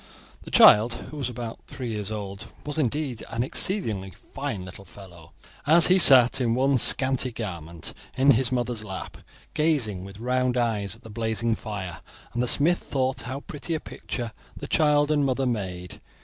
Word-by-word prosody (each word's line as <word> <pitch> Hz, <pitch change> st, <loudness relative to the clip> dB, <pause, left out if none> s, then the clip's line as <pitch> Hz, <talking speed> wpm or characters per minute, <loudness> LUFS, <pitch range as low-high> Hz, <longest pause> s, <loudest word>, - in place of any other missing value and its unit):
The -, -, -11 dB
child, 110 Hz, +3 st, +7 dB
who 155 Hz, -, -9 dB
was 135 Hz, -4 st, -3 dB
about 120 Hz, -2 st, -7 dB
three 125 Hz, -3 st, -6 dB
years 105 Hz, -2 st, -3 dB
old, 100 Hz, -2 st, -6 dB, 0.2 s
was 150 Hz, +1 st, -3 dB
indeed 135 Hz, -2 st, -2 dB
an 115 Hz, +1 st, -2 dB
exceedingly 115 Hz, -, -1 dB
fine 110 Hz, +1 st, -7 dB
little 95 Hz, +1 st, -10 dB
fellow, 85 Hz, -5 st, -14 dB, 0.4 s
as 165 Hz, +2 st, +6 dB
he 190 Hz, -, +4 dB
sat, 135 Hz, -4 st, +8 dB
in 115 Hz, -2 st, +1 dB
one 135 Hz, +1 st, +2 dB
scanty 130 Hz, +1 st, +2 dB
garment, 85 Hz, -8 st, -6 dB, 0.2 s
in 135 Hz, +2 st, +5 dB
his 125 Hz, 0 st, +2 dB
mother's 120 Hz, -3 st, -2 dB
lap, 95 Hz, -3 st, -7 dB, 0.4 s
gazing 130 Hz, -, 0 dB
with 100 Hz, +1 st, -11 dB
round 125 Hz, +1 st, 0 dB
eyes 105 Hz, -4 st, -1 dB
at 115 Hz, -, -20 dB
the 110 Hz, -, -11 dB
blazing 115 Hz, +1 st, -1 dB
fire; 95 Hz, -8 st, -6 dB, 0.3 s
and 120 Hz, -, -1 dB
the 125 Hz, -, 0 dB
smith 165 Hz, +8 st, +4 dB
thought 130 Hz, -2 st, -2 dB
how 135 Hz, +2 st, -5 dB
pretty 155 Hz, +3 st, -5 dB
a -, -, -2 dB
picture 120 Hz, -5 st, -6 dB, 0.3 s
the -, -, -7 dB
child 150 Hz, -1 st, +2 dB
and 145 Hz, -1 st, +2 dB
mother 135 Hz, 0 st, 0 dB
made. 95 Hz, -7 st, -4 dB
120 Hz, 175 wpm, -25 LUFS, 105-135 Hz, 0.4 s, sat